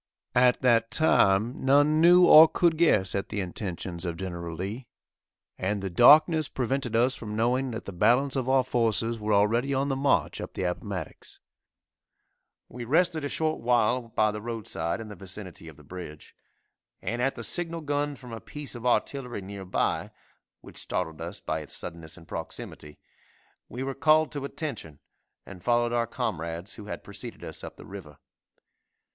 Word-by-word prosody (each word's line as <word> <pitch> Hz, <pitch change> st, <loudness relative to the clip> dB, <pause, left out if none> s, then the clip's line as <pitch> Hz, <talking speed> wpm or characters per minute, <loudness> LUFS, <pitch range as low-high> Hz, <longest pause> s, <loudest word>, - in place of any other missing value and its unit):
At 125 Hz, 0 st, +4 dB
that 115 Hz, -2 st, +3 dB
time 115 Hz, -6 st, +2 dB
none 145 Hz, +3 st, +4 dB
knew 175 Hz, +2 st, +7 dB
or 160 Hz, -1 st, +10 dB
could 170 Hz, 0 st, +2 dB
guess 105 Hz, -, +3 dB
at 100 Hz, -, -2 dB
the 105 Hz, -, -3 dB
intentions 90 Hz, -2 st, -5 dB
of 85 Hz, -2 st, -3 dB
Gen. 85 Hz, -3 st, -5 dB
Lee, 105 Hz, +8 st, -5 dB, 0.7 s
and 100 Hz, +2 st, -1 dB
the 95 Hz, -1 st, -4 dB
darkness 155 Hz, -, +6 dB
prevented 130 Hz, -2 st, -2 dB
us 125 Hz, +3 st, +3 dB
from 105 Hz, -4 st, -6 dB
knowing 125 Hz, +4 st, +1 dB
that 115 Hz, -1 st, -6 dB
the -, -, -6 dB
balance 120 Hz, +9 st, +2 dB
of 130 Hz, -1 st, -1 dB
our 130 Hz, -1 st, +4 dB
forces 115 Hz, -2 st, 0 dB
were 105 Hz, 0 st, -2 dB
already 115 Hz, +7 st, +2 dB
on 135 Hz, +2 st, 0 dB
the 135 Hz, -, 0 dB
march, 140 Hz, +1 st, +1 dB
up -, -, -8 dB
the -, -, -2 dB
Appomattox. 90 Hz, -1 st, -5 dB, 1.3 s
We 120 Hz, 0 st, -8 dB
rested 160 Hz, +4 st, +1 dB
a 145 Hz, -, -2 dB
short 155 Hz, +1 st, -1 dB
while 120 Hz, 0 st, +2 dB
by 110 Hz, -1 st, +1 dB
the 105 Hz, 0 st, -6 dB
roadside 110 Hz, -7 st, -3 dB
in 110 Hz, -, -8 dB
the 105 Hz, -, -9 dB
vicinity 95 Hz, -2 st, -9 dB
of 80 Hz, -, -12 dB
the 75 Hz, -, -16 dB
bridge, 75 Hz, -1 st, -10 dB, 0.6 s
and 120 Hz, +6 st, -3 dB
at 135 Hz, +2 st, 0 dB
the 115 Hz, -, -7 dB
signal 165 Hz, -, -2 dB
gun 145 Hz, -1 st, -1 dB
from 125 Hz, -3 st, -11 dB
a 115 Hz, -, -7 dB
piece 145 Hz, -2 st, -7 dB
of 120 Hz, 0 st, -4 dB
artillery 125 Hz, -2 st, -1 dB
near 100 Hz, 0 st, -8 dB
by, 90 Hz, -, -1 dB, 0.5 s
which -, -, -9 dB
startled 80 Hz, 0 st, -3 dB
us 85 Hz, +5 st, -6 dB
by 80 Hz, -, -3 dB
its 75 Hz, -, -6 dB
suddenness 80 Hz, 0 st, -8 dB
and 80 Hz, -3 st, -15 dB
proximity, 75 Hz, -2 st, -7 dB, 0.7 s
we 125 Hz, +3 st, -5 dB
were 135 Hz, 0 st, -3 dB
called 155 Hz, +3 st, +3 dB
to 140 Hz, -2 st, -4 dB
attention 140 Hz, -, -5 dB, 0.5 s
and 90 Hz, -3 st, -12 dB
followed 120 Hz, 0 st, +2 dB
our 120 Hz, -1 st, +1 dB
comrades 85 Hz, -, -4 dB
who 105 Hz, -, -10 dB
had 105 Hz, -, -7 dB
preceded 105 Hz, +4 st, -8 dB
us -, -, -8 dB
up -, -, -9 dB
the -, -, -12 dB
river. 85 Hz, -8 st, -10 dB
115 Hz, 175 wpm, -27 LUFS, 95-135 Hz, 1.3 s, or